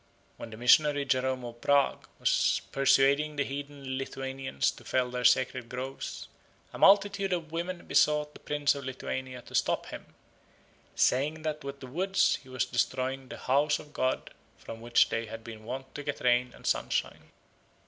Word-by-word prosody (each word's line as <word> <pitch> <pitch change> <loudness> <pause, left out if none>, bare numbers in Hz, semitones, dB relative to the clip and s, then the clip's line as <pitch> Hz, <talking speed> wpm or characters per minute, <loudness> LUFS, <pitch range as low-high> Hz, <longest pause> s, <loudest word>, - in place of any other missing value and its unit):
When - - -8
the 110 - -10
missionary 145 +4 +4
Jerome 130 -1 0
of 120 0 -9
Prague 140 -1 +2
was - - +2
persuading 140 +2 +3
the 140 - +1
heathen 140 -1 -5
Lithuanians 135 - -2
to - - -15
fell 125 -1 0
their 125 0 -3
sacred 125 0 +2
groves, 130 +2 -6 0.5
a - - -8
multitude 200 0 +5
of 165 -3 -2
women 175 +2 -4
besought 150 0 +2
the - - -13
Prince 145 -1 +1
of 140 -1 -7
Lithuania 130 -1 -5
to - - -15
stop - - +1
him, - - -10 0.8
saying 150 +5 +1
that 155 -1 -3
with 140 0 -7
the - - -7
woods 185 +9 +1
he 130 - -17
was 130 -1 -1
destroying 130 +2 -1
the - - -8
house 145 +3 +2
of 150 -1 -13
god 130 0 -1 0.3
from 115 - -9
which 120 0 +3
they 115 0 -2
had 115 +1 -8
been 110 -1 -10
wont 130 +3 -6
to 145 - -6
get 145 0 -4
rain 125 0 +2
and - - -15
sunshine. - - -1
135 Hz, 170 wpm, -29 LUFS, 125-150 Hz, 0.8 s, multitude